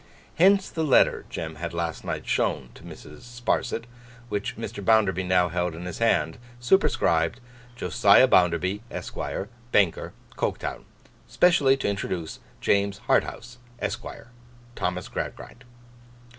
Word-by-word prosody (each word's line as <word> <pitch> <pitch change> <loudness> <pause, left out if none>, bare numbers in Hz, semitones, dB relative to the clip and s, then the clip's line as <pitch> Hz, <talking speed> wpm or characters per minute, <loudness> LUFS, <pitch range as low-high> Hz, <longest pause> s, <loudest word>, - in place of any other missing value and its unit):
Hence 195 +2 +5
the 160 - -2
letter 145 -5 +3
Jem 80 -1 -6
had 85 +1 -5
last 85 -1 -3
night - - -4
shown - - 0
to - - -15
Mrs. 75 0 -12
Sparsit, 120 -1 -2 0.5
which 105 -2 -3
Mr. 105 -2 -6
Bounderby 100 -4 +3
now 90 -1 +2
held 90 0 -2
in 85 +2 -8
his 90 - -6
hand; 80 -7 +1 0.2
superscribed, 120 - +2 0.4
'Josiah 90 -8 +5
Bounderby, 90 +3 +2
Esquire, 100 - -5 0.2
Banker, 95 -5 +2 0.2
Coketown. - - -3 0.4
Specially 145 -7 +4
to - - -2
introduce 95 -5 -3 0.2
James 100 0 +1
Harthouse, 120 +1 0 0.2
Esquire. 120 - -6 0.4
Thomas 90 -4 -3
Gradgrind. 120 - -7
95 Hz, 120 wpm, -25 LUFS, 85-120 Hz, 0.5 s, Hence